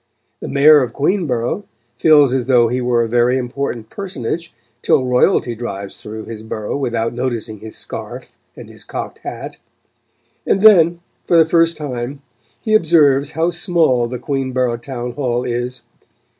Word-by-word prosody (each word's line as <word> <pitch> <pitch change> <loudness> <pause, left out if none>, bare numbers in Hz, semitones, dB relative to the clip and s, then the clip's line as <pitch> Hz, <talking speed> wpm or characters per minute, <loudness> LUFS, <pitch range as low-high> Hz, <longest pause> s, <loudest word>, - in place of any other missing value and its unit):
The - - -6
Mayor 145 +2 +6
of 120 -3 -3
Queenborough 150 - -1 0.3
feels 145 -1 +5
as 130 -2 -1
though 120 -3 +4
he 125 +2 -1
were 120 -1 +1
a - - -2
very 120 +2 +2
important 125 -3 -4
personage 170 - -5 0.3
till 130 - +2
Royalty 125 -1 +2
drives 100 -4 -6
through 110 0 -8
his 110 -2 -8
borough 110 -1 -5
without 115 -4 -2
noticing 120 -4 -4
his 110 +1 -8
scarf - - -7 0.2
and - - -11
his - - -12
cocked - - -6
hat; - - -7 0.9
and 195 - +1
then, 175 -5 +6 0.2
for 170 - +2
the 165 - +6
first 165 0 +2
time, 140 -1 -5 0.4
he 215 - -2
observes 150 -7 +3
how 165 +2 0
small 165 -9 +1
the 125 +1 -5
Queenborough 130 -3 -1
town 120 0 -6
hall 125 -3 -2
is. 120 0 -3
130 Hz, 155 wpm, -18 LUFS, 120-155 Hz, 0.9 s, Mayor